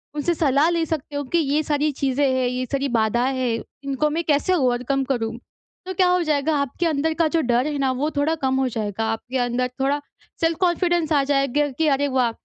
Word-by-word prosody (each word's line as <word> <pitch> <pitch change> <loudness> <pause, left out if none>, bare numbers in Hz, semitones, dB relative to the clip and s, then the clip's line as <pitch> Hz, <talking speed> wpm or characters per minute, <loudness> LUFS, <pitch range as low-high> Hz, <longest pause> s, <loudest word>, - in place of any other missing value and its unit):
उनसे 300 +4 0
सलाह 290 +1 +3
ले 335 -1 0
सकते 300 -2 -4
हो, 285 - -1
कि 340 +6 -1
ये 300 -1 +1
सारी 295 0 0
चीज़ें 275 0 0
हैं, 260 -1 +1
ये 250 +1 -2
सारी 275 0 0
बाधाएँ 240 +4 +1
हैं, 235 -3 -1 0.2
इनको 275 +2 0
मैं 330 +3 -1
कैसे 300 +4 +2
ओवरकम 260 -2 +1
करूँ? 230 -2 -2 0.5
तो 375 - -4
क्या 370 0 +3
हो 360 0 +3
जाएगा 305 0 +1
आपके 280 +6 -2
अंदर 315 0 +1
का 325 - +4
जो 325 +1 +1
डर 245 0 +1
है 295 -1 -2
ना, 270 -1 +1
वो 270 +4 -1
थोड़ा 310 +3 +2
कम 265 0 +2
हो 265 - +1
जाएगा, 220 -1 -3
आपके 245 +4 -4
अंदर 245 0 0
थोड़ा 280 +2 +1 0.4
सेल्फ 330 -1 +1
कॉन्फिडेंस 345 -2 +1
आ 280 -2 +3
जाएगा 275 +1 +1
कि 320 -1 +2
अरे 285 0 +2
वाह! 255 -3 +1
280 Hz, 215 wpm, -22 LUFS, 255-310 Hz, 0.5 s, का